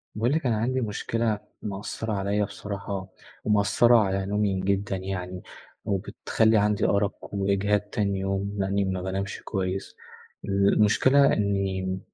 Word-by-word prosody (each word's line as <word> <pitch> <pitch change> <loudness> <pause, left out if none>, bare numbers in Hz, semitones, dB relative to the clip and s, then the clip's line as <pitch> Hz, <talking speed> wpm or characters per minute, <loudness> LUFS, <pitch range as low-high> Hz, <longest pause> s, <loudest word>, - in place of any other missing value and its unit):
باقول 120 +6 +1
لِك، 160 -2 0
أنا 120 -3 +2
عندي 130 +4 0
مشكلة 110 0 -1 0.2
مأثرة 105 +2 -4
عليا 100 +1 0
بصراحة، 100 -1 -5 0.4
ومأثرة 110 +3 +4
على 95 -2 +1
نومي 100 -1 0
جدًا، 100 +1 0
يعني 95 -1 -5 0.4
وبتخلّي 110 +3 +1
عندي 105 0 +2
أرق 100 0 +2 0.2
وإجهاد 100 +1 +1
تاني 100 -1 -2
يوم، 100 +1 -2
لأني 100 0 0
ما 95 -1 -2
بانامش 95 +1 -3
كويس. 95 -1 -3 0.5
المشكلة 105 +7 +4
إني 95 -2 -1
100 Hz, 125 wpm, -26 LUFS, 95-105 Hz, 0.5 s, ومأثرة